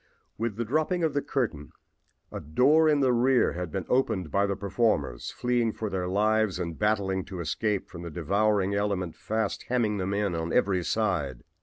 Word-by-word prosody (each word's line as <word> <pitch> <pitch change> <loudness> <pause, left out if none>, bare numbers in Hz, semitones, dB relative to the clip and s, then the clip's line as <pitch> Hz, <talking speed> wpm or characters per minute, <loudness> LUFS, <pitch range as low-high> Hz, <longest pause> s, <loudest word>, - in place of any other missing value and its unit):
With 115 -1 -2
the 120 +2 -2
dropping 155 +8 0
of 160 -3 +1
the 145 - +1
curtain 100 - -3 0.6
a - - -5
door 145 - +4
in 145 -2 +3
the 130 -2 +3
rear 125 +1 +3
had 90 -1 -5
been 95 0 -3
opened 100 -10 0
by 100 +1 +2
the 100 - -1
performers, 95 - 0
fleeing 120 -2 0
for 110 -2 -4
their 90 -1 -2
lives 105 +1 +2
and 85 -2 -4
battling 100 -3 +1
to 95 -2 -7
escape 100 +6 -1
from 85 - -10
the 85 - -6
devouring 100 +4 +1
element 100 -4 -1
fast 110 -1 -2
hemming 115 -4 +1
them 95 +1 -2
in 100 -3 0
on 80 0 -3
every 95 -5 +2
side. 85 - -1
100 Hz, 185 wpm, -27 LUFS, 90-115 Hz, 0.6 s, door